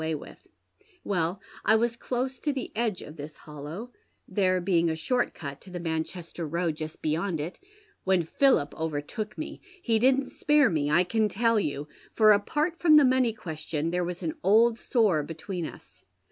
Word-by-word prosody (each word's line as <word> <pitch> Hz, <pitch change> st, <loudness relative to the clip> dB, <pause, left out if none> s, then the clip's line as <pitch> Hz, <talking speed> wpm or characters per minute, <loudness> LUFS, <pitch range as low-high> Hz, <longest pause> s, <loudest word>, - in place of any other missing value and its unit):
away 160 Hz, 0 st, -1 dB
witli. -, -, -11 dB, 0.6 s
Well, 180 Hz, -1 st, -1 dB, 0.2 s
I 220 Hz, -, +5 dB
was 230 Hz, +1 st, +1 dB
close 255 Hz, +2 st, -3 dB
to 295 Hz, -, 0 dB
the 265 Hz, -2 st, -4 dB
edge 220 Hz, -4 st, -1 dB
of 150 Hz, +3 st, -11 dB
this 150 Hz, +1 st, -8 dB
hollow 155 Hz, +10 st, -8 dB, 0.2 s
— -, -, -44 dB
there 185 Hz, -3 st, +2 dB
being 175 Hz, -2 st, +2 dB
a 160 Hz, -, -1 dB
short 245 Hz, +10 st, 0 dB
cut 140 Hz, -2 st, -7 dB
to -, -, -14 dB
the 180 Hz, -1 st, -5 dB
Manchester 165 Hz, 0 st, -4 dB
road 170 Hz, 0 st, -1 dB
just 155 Hz, 0 st, -7 dB
beyond 160 Hz, +2 st, 0 dB
it 160 Hz, +5 st, -5 dB, 0.2 s
— 420 Hz, -1 st, -34 dB
when 190 Hz, -2 st, +3 dB
Philip 165 Hz, -, +2 dB
overtook 160 Hz, +8 st, -4 dB
me. 310 Hz, -, -6 dB, 0.2 s
He 230 Hz, -10 st, +1 dB
didn't 265 Hz, +3 st, +3 dB
spare 295 Hz, -6 st, +3 dB
me, 145 Hz, -3 st, 0 dB
I 170 Hz, +4 st, +4 dB
can 215 Hz, +3 st, +1 dB
tell 230 Hz, +3 st, +2 dB
you, 145 Hz, -5 st, -3 dB, 0.3 s
for, 215 Hz, -1 st, +7 dB
apart 295 Hz, -, +1 dB
from 315 Hz, -3 st, +6 dB
the 295 Hz, -2 st, +8 dB
money 255 Hz, -2 st, +3 dB
question, 160 Hz, -4 st, -4 dB
there 180 Hz, 0 st, 0 dB
was 175 Hz, 0 st, -5 dB
an 315 Hz, -, -1 dB
old 225 Hz, +3 st, +4 dB
sore 210 Hz, -, +2 dB
between 165 Hz, +3 st, -5 dB
us. -, -, -14 dB
185 Hz, 190 wpm, -27 LUFS, 160-235 Hz, 0.6 s, the